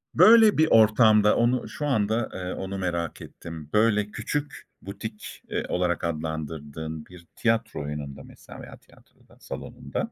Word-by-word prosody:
Böyle 220 -3 +7
bir 160 0 +4
ortamda 110 -1 +5
onu 120 -1 +1
şu 125 +6 -5
anda, 110 -2 0
eee, 90 0 -5
onu 95 +1 -5
merak 85 -3 -3
ettim. 80 -3 -10
Böyle, 105 -1 +2
küçük 145 -1 -4 0.2
butik, 105 +2 -8
eee, - - -2
olarak 90 -1 0
adlandırdığın 80 -1 -5
bir 90 -2 -15
tiyatro 115 -7 0
oyununda 70 -2 -6
mesela - - -13
veya - - -11
tiyatroda, - - -24
salonunda, - - -6
100 Hz, 135 wpm, -25 LUFS, 80-115 Hz, 0.2 s, Böyle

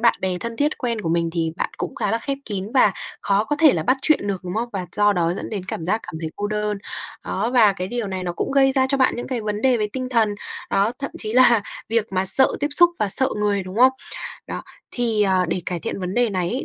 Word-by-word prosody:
bạn 235 0 +4
bè 185 -1 -1
thân 230 +3 -5
thiết 295 +2 0
quen 235 -3 -2
của 170 - -3
mình 170 0 +1
thì 165 -2 -1
bạn - - -2
cũng - - -4
khá 200 - -1
là 225 - +1
khép 275 +3 -3
kín 205 +1 -5
và 215 -6 +5 0.3
khó 200 +1 +1
có 295 +5 -1
thể 315 -4 +7
là - - -1
bắt 255 +2 +2
chuyện 310 -9 +3
được, 195 -2 -2
đúng 180 +1 -4
không? 235 +2 -1
Và 185 -3 -3
do 205 0 +4
đó 170 -2 +1
dẫn 180 - -6
đến 205 -4 -3
cảm 160 - -4
giác 215 +5 0
cảm 175 - -9
thấy 160 -1 -4
cô 205 - -2
đơn. 210 -1 -2 0.5
Đó, 215 +5 -1
và 225 -5 +5
cái 185 -1 -5
điều 240 -1 -2
này 190 -1 -4
nó 175 - -2
cũng 175 - -3
gây 270 -1 +4
ra 260 -1 +3
cho 275 - +1
bạn 260 - +3
những 240 - -5
cái 250 -3 -2
vấn 210 0 -3
đề 260 -2 +4
về 210 -2 -1
tinh 255 -1 -3
thần, 225 -4 +2 0.4
đó, 200 +4 +2
thậm 275 - -4
chí 215 -1 -3
là 240 -3 +6 0.3
việc 225 -1 +1
mà 185 0 +1
sợ 230 +8 +6
tiếp 290 - +1
xúc 345 +4 +5
và 210 - +1
sợ 260 +7 +1
người, 205 -2 +1
đúng 185 +2 -8
không? 255 +3 +6 0.5
Đó, - - -5 0.3
thì, 230 -4 +1
à, 190 -2 +2
để 180 - -2
cải 175 -2 -2
thiện - - -4
vấn 180 +1 -3
đề 240 -2 +2
này 180 -2 -1
ấy, 250 - -2
210 Hz, 280 wpm, -22 LUFS, 190-245 Hz, 0.5 s, thể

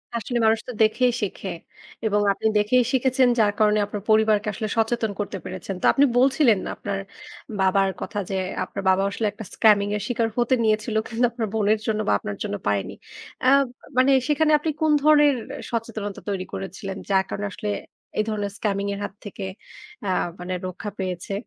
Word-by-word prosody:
আসলে 235 +2 -2
মানুষ 220 0 +4
তো - - -4
দেখেই 245 +3 +3
শেখে 200 -1 -3 0.6
এবং 210 -1 +2
আপনি 220 - -1
দেখেই 220 +5 +3
শিখেছেন 260 0 +3
যার 210 -2 +4
কারণে 210 0 +4
আপনার 205 -1 -6
পরিবারকে 215 -1 +4
আসলে 215 +2 -3
সচেতন 225 -1 +1
করতে 205 -1 -3
পেরেছেন। 185 +1 -6
তো - - -1
আপনি 285 - +5
বলছিলেন 260 -4 +4 0.2
আপনার 200 -1 -4 0.6
বাবার 190 +1 +3
কথা 205 - -3
যে, 195 - -2 0.3
আপনার 200 - -6
বাবাও 190 +1 +3
আসলে 220 - -2
একটা 215 +2 -9
scamming 205 -2 +4
এর 210 - -2
শিকার 235 -2 0
হতে 240 +1 +3
নিয়েছিল 215 +1 +1
কিন্তু 235 +2 +1
আপনার 230 -2 -3
বোনের 215 0 +2
জন্য 215 -1 0
বা - - +4
আপনার 105 0 -5
জন্য 100 - -3
পারেনি। 100 -1 0 0.5
অ্যা 255 - +5 0.5
মানে 260 +2 +5 0.2
সেখানে 310 +1 +3
আপনি 315 - -2
কোন 315 -1 +3
ধরনের 295 -1 +6 0.4
সচেতনতা 220 -3 -4
তৈরি 190 -2 -2
করেছিলেন? 195 0 -5
যার 190 -1 +3
কারণে 205 - -3
আসলে 210 +2 -5 0.5
এই 215 - +3
ধরনের 205 -2 -2
scamming 200 -1 -1
এর 200 - -5
হাত 205 - -5
থেকে 200 -1 -6 0.6
অ্যা 195 - -1 0.3
মানে 180 +1 -4
রক্ষা 185 +3 -6
পেয়েছে। 185 0 -3
215 Hz, 175 wpm, -24 LUFS, 200-235 Hz, 0.6 s, ধরনের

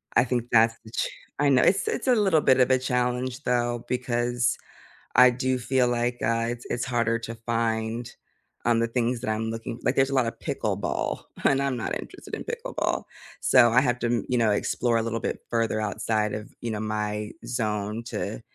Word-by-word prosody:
I - - +6
think 120 -2 -1
that's 115 0 +5
the 110 - -12
ch - - -1 0.3
I 145 -1 +4
know, 130 -2 +5
it's 195 - +3
it's - - -3
a 250 - +5
little 195 -7 +4
bit 130 -2 +4
of 125 - +4
a 130 - +4
challenge 125 +1 -1
though, 120 -1 0
because 120 -1 0 0.6
I 125 0 +8
do 130 +1 0
feel 125 +1 +2
like, 120 0 0
uh, 115 0 +1
it's 120 0 -5
it's 120 +1 -1
harder 115 -2 +1
to 115 0 -6
find, 115 0 -1 0.6
um, 120 -1 +3
the 115 - +1
things 120 +1 0
that 120 - -3
I'm 110 +1 -1
looking 115 +1 -5
like, 125 - +1
there's 135 0 +4
a - - -3
lot 130 -3 +3
of 115 - -6
pickleball, - - -2 0.2
and 135 0 +3
I'm 140 -2 0
not - - -2
interested - - -11
in - - -6
pickleball. 470 +2 -2 0.4
So, 125 -2 +6
I 125 +2 +5
have 125 -2 0
to 120 - 0
m 120 -1 0
you 125 - +2
know, 115 -3 +3
explore 115 +3 0
a - - +2
little 115 0 -2
bit - - -3
further 115 -2 0
outside 105 0 -1
of, 105 0 -5
you 120 - -3
know, 105 - -3
my 105 0 -2
zone 105 -2 -2
to - - -4
120 Hz, 205 wpm, -26 LUFS, 115-125 Hz, 0.6 s, I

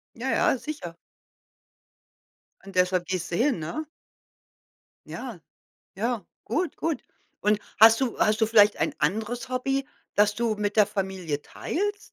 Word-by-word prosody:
Ja, 255 +3 -3
ja, 265 - +3
sicher. 265 - -6 1.7
Und 195 -1 -11
deshalb 180 -1 +2
gehst 180 -2 -3
du - - 0
hin, 250 - +2
ne? 305 - -4 1.2
Ja, 235 -9 -7 0.6
ja, 225 -2 -2 0.2
gut, 330 +9 -1
gut. 325 -2 -2 0.4
Und 210 0 +3 0.2
hast 225 +3 +8
du 255 -3 -1
hast 215 +1 +3
du 220 - +4
vielleicht 210 -2 +6
ein - - 0
anderes 220 +10 -1
Hobby, 270 +2 -1 0.3
das 210 0 +4
du 230 -1 0
mit 205 0 -2
der 210 -2 +6
Familie 190 -7 -3
teilst? 410 +3 -3
215 Hz, 140 wpm, -26 LUFS, 190-255 Hz, 1.7 s, hast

